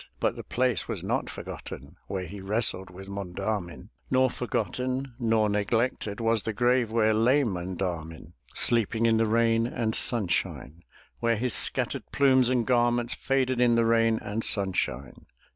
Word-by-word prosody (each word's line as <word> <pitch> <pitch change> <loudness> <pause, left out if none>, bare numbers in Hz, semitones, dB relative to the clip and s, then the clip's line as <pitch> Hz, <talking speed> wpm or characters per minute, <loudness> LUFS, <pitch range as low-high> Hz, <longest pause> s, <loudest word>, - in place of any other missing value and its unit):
But - - 0
the - - -8
place 125 - 0
was - - -4
not - - -2
forgotten - - -9
Where 95 -2 -4
he 100 +3 -9
wrestled 95 -2 0
with 95 +2 -11
Monda'min; 100 -1 -5 0.2
Nor 130 -1 +3
forgotten 125 +3 -2
nor 110 -2 +2
neglected 105 +1 -1
Was 115 -1 +1
the 110 - -4
grave 120 +1 +2
where 110 -1 +2
lay 125 +7 +3
Monda'min, 90 -5 -4 0.2
Sleeping 115 0 +2
in 115 -1 +3
the 115 0 +2
rain 115 +1 +2
and 115 -3 -2
sunshine; 90 - +1 0.4
Where 115 0 +1
his 125 0 -1
scattered - - 0
plumes 130 -3 +4
and 125 -3 +1
garments 120 -1 +1
Faded 130 -2 0
in 120 -1 +4
the 115 0 +3
rain 115 -1 +3
and 110 +2 -3
sunshine. 90 - -1
115 Hz, 150 wpm, -27 LUFS, 100-120 Hz, 0.4 s, plumes